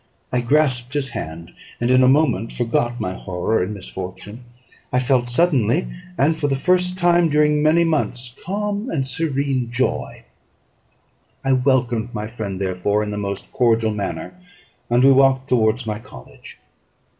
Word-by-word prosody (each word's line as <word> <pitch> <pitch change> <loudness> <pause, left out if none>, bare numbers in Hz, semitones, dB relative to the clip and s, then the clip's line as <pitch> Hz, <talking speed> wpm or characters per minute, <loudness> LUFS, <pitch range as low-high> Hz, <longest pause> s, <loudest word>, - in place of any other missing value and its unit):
I 125 - +1
grasped 130 -1 +1
his 140 -2 -1
hand, 85 -6 -7 0.3
and 120 +1 +1
in 130 0 +5
a 130 - +5
moment 130 -6 +2
forgot 120 0 -1
my 95 -4 -2
horror 95 +4 -1
and 90 - -2
misfortune; 95 +3 -8 0.5
I 125 - +1
felt 125 -1 +1
suddenly, 135 - +2 0.3
and 160 +3 +2
for 145 - +1
the 135 - +1
first 180 +5 +1
time 175 -2 +3
during 150 0 +3
many 155 +3 +4
months, 130 -6 -1
calm 205 +4 -3
and 135 -4 -1
serene 135 -3 -1
joy. 125 +2 -2 1.2
I 135 - +3
welcomed 125 -3 +1
my 105 0 -3
friend, 110 -4 -5
therefore, 95 +2 0
in 105 - -4
the 105 - -4
most 100 -1 -5
cordial 115 -2 +2
manner, 105 - -4 0.6
and 120 +1 +3
we 135 - +7
walked 135 0 +3
towards 115 0 +2
my 105 -1 -3
college. 70 - -13
125 Hz, 155 wpm, -21 LUFS, 110-145 Hz, 1.2 s, we